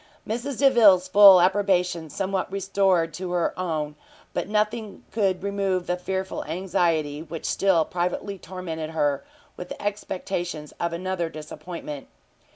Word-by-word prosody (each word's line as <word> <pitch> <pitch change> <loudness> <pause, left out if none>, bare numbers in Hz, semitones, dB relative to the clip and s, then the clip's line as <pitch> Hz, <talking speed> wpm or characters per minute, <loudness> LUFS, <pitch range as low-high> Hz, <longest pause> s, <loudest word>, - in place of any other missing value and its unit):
Mrs 240 +4 -3
Delvile's 220 -9 +6
full 195 -1 +9
approbation 180 -3 +2
somewhat 190 +2 -2
restored 195 -4 +1
to 185 +2 -5
her 175 -1 +2
her - - -13
own, 155 -4 -2 0.4
but - - -2
nothing 215 0 -1
could 190 -3 0
remove 195 -2 -1
the 180 - 0
fearful 190 +1 -3
anxiety, 165 -5 0
which 160 0 -7
still 185 -5 +2
privately 180 +2 -3
tormented 165 -4 -6
her 145 -3 0 0.3
with 180 - -6
expectations 180 -6 -4
of 170 -1 -1
another 175 0 -2
disappointment. 155 -1 -8
185 Hz, 130 wpm, -25 LUFS, 165-195 Hz, 0.4 s, full